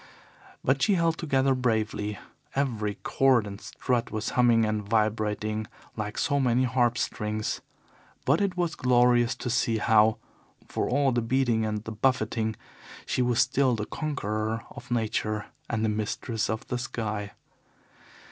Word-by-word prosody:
But 135 +1 +2
she 205 - +4
held 165 -2 +1
together 135 -4 +2
bravely. 110 -4 -1 0.4
Every 110 -7 -1
cord 130 -5 +3
and 100 0 -8
strut 120 -2 -1
was 110 0 -3
humming 120 -2 +4
and 110 0 0
vibrating 110 0 0 0.3
like 105 -1 -4
so 140 -1 +1
many 125 -1 +3
harp 125 -1 +2
strings, 105 -1 -2 0.6
but 145 +7 +3
it 190 -2 0
was 175 -3 0
glorious 120 -1 +3
to 125 - -4
see 115 -2 +1
how, 110 0 +4 0.5
for - - -2
all 140 +1 +3
the 120 -1 +1
beating 115 -2 +1
and 105 -1 -3
the 110 - -6
buffeting, 110 -1 0 0.5
she - - 0
was 120 -2 +2
still 130 -3 +3
the 105 -1 -3
conqueror 110 -7 -2
of 125 - -11
Nature 110 -2 -1 0.2
and 110 -1 0
the - - +2
mistress 110 +1 -2
of 110 0 -3
the 125 - -1
sky. 110 -4 -4
115 Hz, 145 wpm, -27 LUFS, 110-130 Hz, 0.6 s, she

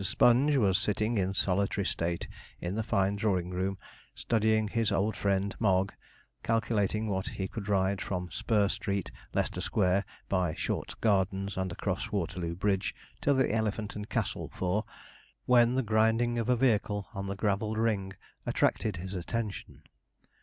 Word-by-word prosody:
Sponge 125 +7 +4
was 100 -6 +3
sitting 110 +1 0
in 95 +1 0
solitary 100 +1 +1
state 85 -2 -1 0.3
in 85 +2 -3
the 110 - -1
fine 100 -3 +1
drawing 95 -4 0
room, 95 +2 -1 0.4
studying 110 -1 +2
his 115 0 0
old 105 +3 +1
friend 100 0 0
Mogg, 95 -3 +2 0.5
calculating 110 -2 +1
what 95 -2 -1
he 105 -5 -3
could 100 +1 -6
ride 95 0 +2
from 90 -3 -3
Spur 105 +5 +2
Street, 100 -1 -2 0.2
Leicester - - 0
Square, 100 -1 +2 0.2
by 90 -4 0
Short's - - -3
Gardens, 100 -2 +1
and 95 -1 -2
across 100 +2 -3
Waterloo 85 -3 -2
Bridge, 95 +1 0 0.3
to 145 - +3
the 130 -2 +3
Elephant 110 -1 -1
and 105 +1 -6
Castle - - -2
for, 95 +4 0 0.6
when 120 0 +5
the 130 - +2
grinding 110 +2 +2
of 115 - -1
a 125 - +5
vehicle 105 -5 +1
on 100 0 -4
the 100 - -3
gravelled 105 +2 0
ring 105 -4 0 0.3
attracted 105 -4 +1
his 95 +2 -6
attention. 100 +3 -4
100 Hz, 155 wpm, -30 LUFS, 95-110 Hz, 0.6 s, when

